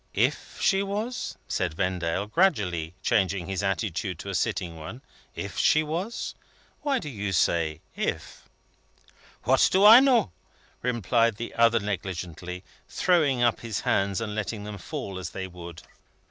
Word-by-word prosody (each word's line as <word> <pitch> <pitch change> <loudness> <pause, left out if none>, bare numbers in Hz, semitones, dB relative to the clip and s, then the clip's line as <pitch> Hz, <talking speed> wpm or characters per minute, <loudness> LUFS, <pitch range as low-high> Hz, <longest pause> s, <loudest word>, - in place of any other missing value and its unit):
"If - - 0
she 195 -1 +3
was?" 210 +5 -3
said 90 -4 -1
Vendale, 90 0 -1
gradually 100 - +1
changing 95 -5 +1
his 95 0 -2
attitude 95 -2 -2
to 100 +4 -6
a - - -5
sitting 90 -1 -1
one. 110 +12 -8 0.3
"If - - -5
she 155 - +4
was? 175 +10 -3 0.5
Why 285 -2 +1
do 155 - -5
you 105 -7 -3
say 80 -3 +1
'if'?" - - -4 0.9
"What 130 +3 +4
do 190 +2 +5
I 225 +3 +11
know?" 255 - +3 0.5
replied 115 -1 +1
the 115 +3 -6
other 115 0 +4
negligently, 90 -3 -5 0.3
throwing 150 -9 +2
up 120 -1 +2
his 115 -3 -4
hands 100 -1 +1
and 110 -2 -3
letting 105 0 -3
them 105 -1 -7
fall 115 -11 -5
as 90 -2 -5
they 95 - -5
would. 85 -2 -10
105 Hz, 145 wpm, -26 LUFS, 90-135 Hz, 0.9 s, I